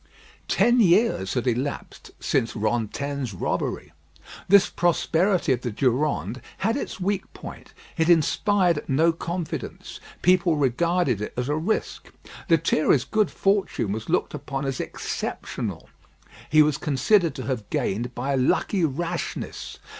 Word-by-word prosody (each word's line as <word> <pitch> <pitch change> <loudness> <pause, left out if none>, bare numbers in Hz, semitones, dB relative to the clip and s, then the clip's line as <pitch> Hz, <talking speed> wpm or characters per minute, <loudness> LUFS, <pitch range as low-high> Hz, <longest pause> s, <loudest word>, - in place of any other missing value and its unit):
Ten 240 +1 +3
years 185 - +3
had 125 - -1
elapsed 130 +3 -3
since 115 -4 0
Rantaine's 120 +3 -2
robbery. - - -3 0.5
This 200 +1 +6
prosperity 175 -1 +1
of 125 - -3
the 125 - -3
Durande 125 -1 0 0.2
had 225 +2 +2
its 280 - -4
weak 195 +1 -2
point. - - -10 0.3
It 160 0 +2
inspired 175 +2 +3
no 160 +5 +4
confidence. 170 0 -5 0.2
People 180 -2 +4
regarded 145 - +1
it 105 - -5
as 125 +2 -2
a 150 - +1
risk. 170 +8 -2 0.4
Lethierry's 155 -4 +3
good 215 -1 +1
fortune 195 - 0
was 110 +6 -5
looked 175 - 0
upon 135 -1 -4
as 135 -2 -2
exceptional. - - -4 0.6
He 155 0 +6
was 150 -1 0
considered 165 +5 +2
to 130 - -5
have 125 -6 -3
gained 120 +5 -2
by 135 +3 -2
a - - +1
lucky 170 +8 +1
rashness. 165 +3 -3
150 Hz, 130 wpm, -24 LUFS, 125-175 Hz, 0.6 s, This